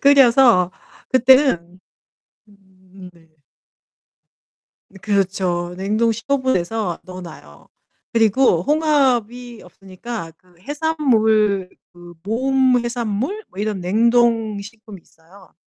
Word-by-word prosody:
끓여서 250 -9 +5 0.4
그때는 255 - +3 0.7
음 190 -2 -17
네. 165 -1 -23 1.6
이 - - -23
그렇죠. 185 -3 -2
냉동 215 +4 0
15 260 +5 -2
도에서 215 -6 -2
넣어 185 0 -10
놔요. 75 - -14 0.4
그리고 225 -5 +2
홍합이 250 -5 0
없으니까 195 -1 -9
그 180 -1 -28
해산물 220 - 0 0.2
그 175 0 -14
모음 255 +3 +1
해산물? 240 - -3
뭐 190 - -12
이런 210 -2 -3
냉동 225 +2 +1
식품 215 -1 -12
있어요. 170 +3 -22
215 Hz, 195 characters per minute, -19 LUFS, 185-245 Hz, 1.6 s, 끓여서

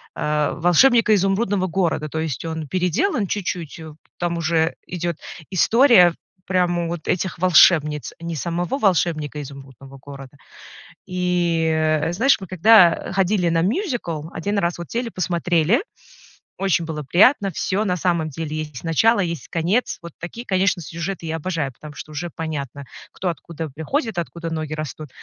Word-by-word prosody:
э, 150 0 0
"Волшебника 215 +7 +4
Изумрудного 195 0 +1
города", 165 -3 -1
то 160 - -4
есть 160 -4 -3
он 160 -2 -4
переделан 185 - 0
чуть-чуть, 175 -5 -4
э, 160 -2 -9 0.2
там 170 -1 -2
уже 160 0 +1
идёт 175 -2 -3 0.3
история 195 - +5 0.3
прямо 175 -2 +1
вот 170 -2 -6
этих 185 -1 -1
волшебниц, 155 -4 +4
не 170 0 -4
самого 175 - -2
"Волшебника 165 - 0
Изумрудного 135 -1 -12
города". 135 0 -11 0.7
И, 175 -3 0
э, 155 +1 +1
знаешь, 255 +10 +3
мы 190 - -7
когда 185 -1 +5
ходили 190 -1 +1
на 165 0 +2
мюзикл, 205 - -2
1 200 +5 -2
раз 170 -2 0
вот 170 - -8
сели, 235 0 -2
посмотрели. 175 - +1 0.8
Очень 190 -3 +1
было 155 -2 -4
приятно, 200 - +4
всё 195 +4 -1
на 180 -4 0
самом 170 -2 0
деле. 155 +1 -5
Есть 150 -4 -6
начало, 205 +8 +3
есть 170 -4 -3
конец. 180 +9 0
Вот 170 -2 -9
такие, 230 +8 -7
конечно, 185 -3 +1
сюжеты 170 +3 -5
я 160 0 -2
обожаю, 155 -5 -3
потому 150 +4 -12
что 155 - -9
уже 165 +4 -4
понятно, 145 -4 -5 0.3
кто 185 - -3
откуда 165 -1 -6
приходит, 190 - -2
откуда 170 0 -5
ноги 155 -1 -3
растут. 155 -1 -6
170 Hz, 150 wpm, -21 LUFS, 155-185 Hz, 0.8 s, история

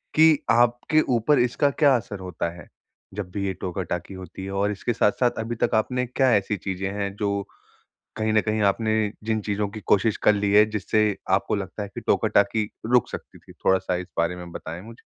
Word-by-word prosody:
कि 160 -1 +6
आपके 120 +6 +3
ऊपर 130 +6 +3
इसका 125 +4 +2
क्या 140 -2 +4
असर 105 -3 -7
होता 90 -2 -3
है, 85 - -12 0.5
जब 100 -2 -5
भी 100 0 -3
ये 95 - -1
टोका-टाकी 90 0 -4
होती 95 0 -8
है? 95 - -5
और 100 +1 0
इसके 105 +4 -2
साथ-साथ, 120 +2 +2
अभी 115 +1 -3
तक - - +2
आपने 125 +3 0
क्या 130 +1 +2
ऐसी 100 +1 0
चीज़ें 95 +1 -3
हैं 100 -1 -3
जो 100 -1 -1 0.7
कहीं 110 0 0
न 110 - +4
कहीं 110 0 -1
आपने 110 +1 +1
जिन 110 0 0
चीज़ों 105 0 -1
की 110 +2 -8
कोशिश 105 +2 +3
कर 105 - +5
ली 100 0 0
है, 105 +1 +7
जिससे 105 0 +1
आपको 95 +1 +2
लगता 100 0 -4
है 100 - -5
कि - - -5
टोका-टाकी 105 +1 +1 0.2
रुक 120 -1 +3
सकती - - -9
थी? - - -16
थोड़ा-सा 95 -1 +1
इस 90 0 -5
बारे 85 +2 +1
में 90 -1 -9
बताएँ 80 +1 -7
मुझे। 115 +3 -13
105 Hz, 200 wpm, -24 LUFS, 95-115 Hz, 0.7 s, है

